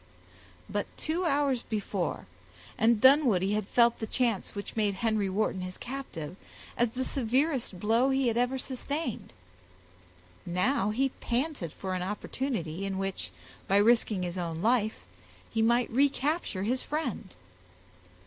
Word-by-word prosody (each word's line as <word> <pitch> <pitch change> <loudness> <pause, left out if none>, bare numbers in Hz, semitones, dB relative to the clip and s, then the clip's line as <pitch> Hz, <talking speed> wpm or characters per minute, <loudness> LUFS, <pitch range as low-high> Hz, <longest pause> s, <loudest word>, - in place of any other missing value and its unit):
But 205 0 -2
two 335 +4 -1
hours 280 -5 +2
before, 215 -4 -3 0.5
and 225 0 +3
Dunwoodie 235 - +5
had 210 -2 -1
felt 235 0 +4
the 220 - -3
chance 230 -5 0
which 200 - -6
made 210 -3 +1
Henry 215 -1 0
Wharton 190 -1 0
his 185 0 -6
captive, 215 - -6 0.4
as 240 0 +2
the 260 +1 -2
severest 260 - 0
blow 230 +6 +3
he 270 -1 +2
had 230 - +1
ever 245 +2 +1
sustained. 265 +1 -4 1.1
Now 190 +5 +1
he 265 +6 +1
panted 245 - -1
for 190 +3 -5
an 185 - -2
opportunity 195 - -3
in 195 -1 -2
which, 195 0 -3 0.4
by 195 - +4
risking 215 -2 +3
his 180 +1 -3
own 165 0 -3
life, 220 -2 +2 0.5
he 225 - 0
might 235 +2 +3
recapture 280 - +1
his 250 +5 0
friend. 250 - -4
225 Hz, 140 wpm, -29 LUFS, 195-260 Hz, 1.1 s, Dunwoodie